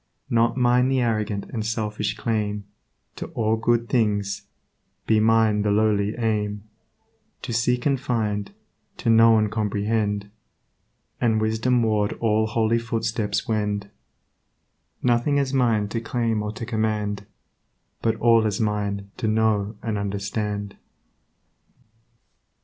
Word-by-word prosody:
Not 115 Hz, +1 st, +2 dB
mine 125 Hz, 0 st, +3 dB
the 135 Hz, -1 st, +2 dB
arrogant 110 Hz, -4 st, -1 dB
and 110 Hz, -3 st, -2 dB
selfish 110 Hz, -1 st, -2 dB
claim 105 Hz, -3 st, -1 dB, 0.5 s
To -, -, -5 dB
all 110 Hz, -1 st, +2 dB
good 115 Hz, +1 st, +1 dB
things; 105 Hz, -5 st, 0 dB, 0.6 s
be 110 Hz, -1 st, +3 dB
mine 110 Hz, -1 st, +3 dB
the 105 Hz, -, +1 dB
lowly 105 Hz, 0 st, +2 dB
aim 105 Hz, -3 st, -1 dB, 0.8 s
To 120 Hz, -, -4 dB
seek 125 Hz, +1 st, +1 dB
and 140 Hz, -2 st, +2 dB
find, 105 Hz, -5 st, -2 dB, 0.5 s
to 115 Hz, -, +1 dB
know 115 Hz, 0 st, +6 dB
and 105 Hz, -1 st, +1 dB
comprehend, 105 Hz, -1 st, -1 dB, 0.9 s
And 110 Hz, -3 st, +2 dB
wisdom 110 Hz, +3 st, +1 dB
ward 105 Hz, -2 st, +1 dB
all 110 Hz, -1 st, +1 dB
holy 110 Hz, +1 st, +1 dB
footsteps 110 Hz, -2 st, -2 dB
wend, 105 Hz, -2 st, -1 dB, 1.1 s
Nothing 125 Hz, +4 st, +2 dB
is 140 Hz, -1 st, 0 dB
mine 115 Hz, -6 st, +2 dB
to 115 Hz, +2 st, -3 dB
claim 115 Hz, -2 st, -1 dB
or 105 Hz, 0 st, -3 dB
to 115 Hz, +1 st, -6 dB
command, 105 Hz, -3 st, -2 dB, 0.7 s
But 115 Hz, -, +1 dB
all 115 Hz, -2 st, +4 dB
is 100 Hz, -2 st, -2 dB
mine 100 Hz, -2 st, -2 dB
to 110 Hz, -, -2 dB
know 110 Hz, -1 st, +1 dB
and 110 Hz, -3 st, -2 dB
understand. 100 Hz, 0 st, -3 dB
110 Hz, 125 wpm, -24 LUFS, 105-115 Hz, 1.1 s, know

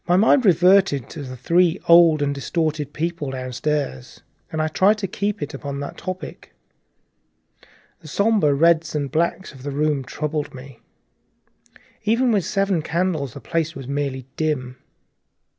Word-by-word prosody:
My 175 Hz, +1 st, +4 dB
mind 230 Hz, +5 st, +4 dB
reverted 180 Hz, -6 st, +4 dB
to 160 Hz, -, -7 dB
the 130 Hz, -2 st, -7 dB
three 175 Hz, +6 st, +2 dB
old 170 Hz, -3 st, +6 dB
and 140 Hz, 0 st, 0 dB
distorted 150 Hz, +1 st, -2 dB
people 165 Hz, -2 st, -3 dB
downstairs, 130 Hz, -, -3 dB, 0.3 s
and 160 Hz, -, -3 dB
I 155 Hz, -, +1 dB
tried 195 Hz, +6 st, +3 dB
to 205 Hz, -2 st, -3 dB
keep 200 Hz, +1 st, -2 dB
it 145 Hz, -, -6 dB
upon 140 Hz, -1 st, -5 dB
that 145 Hz, -, -6 dB
topic. 185 Hz, -3 st, -8 dB, 1.4 s
The -, -, -14 dB
sombre 200 Hz, -1 st, +2 dB
reds 165 Hz, +1 st, +3 dB
and 145 Hz, -2 st, -2 dB
grays 170 Hz, +3 st, -1 dB
of 135 Hz, -, -14 dB
the 145 Hz, -, -5 dB
room 145 Hz, 0 st, 0 dB
troubled 150 Hz, +1 st, -4 dB
me; 130 Hz, -2 st, -12 dB, 1.2 s
even 235 Hz, +4 st, +2 dB
with 200 Hz, -6 st, +1 dB
its -, -, -4 dB
seven 195 Hz, -5 st, +1 dB
candles 165 Hz, -5 st, -2 dB
the -, -, -8 dB
place 165 Hz, 0 st, -2 dB
was 135 Hz, -2 st, -8 dB
merely 140 Hz, -2 st, -3 dB
dim. 130 Hz, -5 st, -2 dB
155 Hz, 155 wpm, -22 LUFS, 140-180 Hz, 1.4 s, old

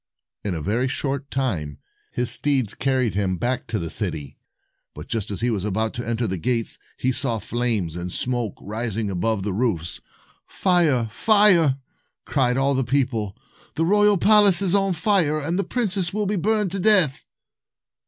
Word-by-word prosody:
In 100 Hz, -4 st, -2 dB
a 80 Hz, -, -5 dB
very 115 Hz, -, 0 dB
short 140 Hz, +1 st, -3 dB
time, 85 Hz, -, -2 dB, 0.3 s
his 125 Hz, 0 st, 0 dB
steeds 135 Hz, -7 st, 0 dB
carried 130 Hz, -6 st, 0 dB
him 95 Hz, -2 st, -1 dB
back 125 Hz, +6 st, -2 dB
to 110 Hz, -, -2 dB
the 85 Hz, -4 st, -4 dB
city; 70 Hz, -3 st, -4 dB, 0.6 s
but, -, -, -9 dB
just 110 Hz, -3 st, -3 dB
as 100 Hz, -, -4 dB
he 120 Hz, +1 st, +1 dB
was 100 Hz, -4 st, -2 dB
about 110 Hz, +2 st, -1 dB
to 120 Hz, -, -6 dB
enter 115 Hz, 0 st, -1 dB
the 95 Hz, -4 st, -3 dB
gates, 115 Hz, +4 st, -1 dB, 0.2 s
he 130 Hz, -, 0 dB
saw 130 Hz, -3 st, -1 dB
flames 110 Hz, -8 st, -2 dB
and 90 Hz, 0 st, -5 dB
smoke 120 Hz, -3 st, 0 dB
rising 110 Hz, 0 st, -3 dB
above 95 Hz, +3 st, -1 dB
the 100 Hz, -1 st, -2 dB
roofs. 90 Hz, -7 st, -2 dB, 0.5 s
"Fire! 165 Hz, -, +1 dB
Fire!" 185 Hz, -, +4 dB, 0.5 s
cried 125 Hz, -2 st, +1 dB
all 135 Hz, +1 st, +2 dB
the 135 Hz, 0 st, +1 dB
people. 120 Hz, -6 st, -1 dB, 0.4 s
"The 165 Hz, -, +1 dB
royal 205 Hz, +2 st, +4 dB
palace 205 Hz, -1 st, +5 dB
is 185 Hz, -2 st, +1 dB
on 195 Hz, -1 st, +2 dB
fire, 165 Hz, -4 st, +1 dB
and 165 Hz, +5 st, -2 dB
the -, -, +1 dB
princess 195 Hz, -7 st, -1 dB
will 210 Hz, +1 st, -2 dB
be 205 Hz, +2 st, -1 dB
burned 210 Hz, +1 st, 0 dB
to 195 Hz, -, -2 dB
death." 185 Hz, -9 st, +3 dB
125 Hz, 175 wpm, -23 LUFS, 105-175 Hz, 0.6 s, palace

